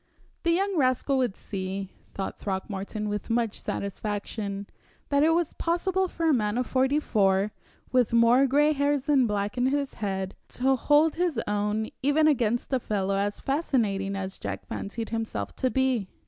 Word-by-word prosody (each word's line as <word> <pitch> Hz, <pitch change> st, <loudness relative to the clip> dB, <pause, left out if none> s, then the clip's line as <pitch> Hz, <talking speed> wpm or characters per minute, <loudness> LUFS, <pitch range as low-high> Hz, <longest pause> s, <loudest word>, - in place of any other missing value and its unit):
The 340 Hz, -, 0 dB
young 385 Hz, +2 st, +1 dB
rascal 265 Hz, 0 st, +2 dB
would 245 Hz, -6 st, 0 dB
see, 195 Hz, 0 st, -5 dB, 0.2 s
thought 195 Hz, -, -4 dB
Throckmorton, 200 Hz, +2 st, -3 dB
with 210 Hz, +1 st, -3 dB
much 230 Hz, -2 st, 0 dB
satisfaction, 200 Hz, 0 st, -4 dB, 0.4 s
that 280 Hz, 0 st, +3 dB
it 325 Hz, +2 st, +4 dB
was 340 Hz, -2 st, 0 dB
possible 375 Hz, +2 st, 0 dB
for 330 Hz, -1 st, -3 dB
a 320 Hz, -, +5 dB
man 210 Hz, -3 st, +1 dB
of 250 Hz, -, +1 dB
forty 265 Hz, +4 st, +2 dB
four, 200 Hz, -6 st, +2 dB, 0.4 s
with 250 Hz, -3 st, +3 dB
more 235 Hz, +3 st, +5 dB
gray 295 Hz, +3 st, +4 dB
hairs 285 Hz, -1 st, +1 dB
than 275 Hz, -5 st, +4 dB
black 205 Hz, +2 st, -2 dB
in 250 Hz, -, +3 dB
his 280 Hz, 0 st, 0 dB
head, 190 Hz, -2 st, -2 dB, 0.2 s
to 265 Hz, +2 st, +3 dB
hold 295 Hz, +5 st, +3 dB
his 345 Hz, -8 st, +1 dB
own 210 Hz, +1 st, -1 dB
even 290 Hz, +3 st, +3 dB
against 240 Hz, -3 st, +1 dB
a 260 Hz, -, +3 dB
fellow 195 Hz, -4 st, -1 dB
as 205 Hz, +1 st, -1 dB
fascinating 220 Hz, -10 st, 0 dB
as 190 Hz, -1 st, -5 dB
Jack 100 Hz, -1 st, -5 dB
fancied 225 Hz, +3 st, -5 dB
himself 220 Hz, -, -3 dB
to 255 Hz, -, +1 dB
be. 260 Hz, -6 st, +1 dB
235 Hz, 165 wpm, -27 LUFS, 200-280 Hz, 0.4 s, a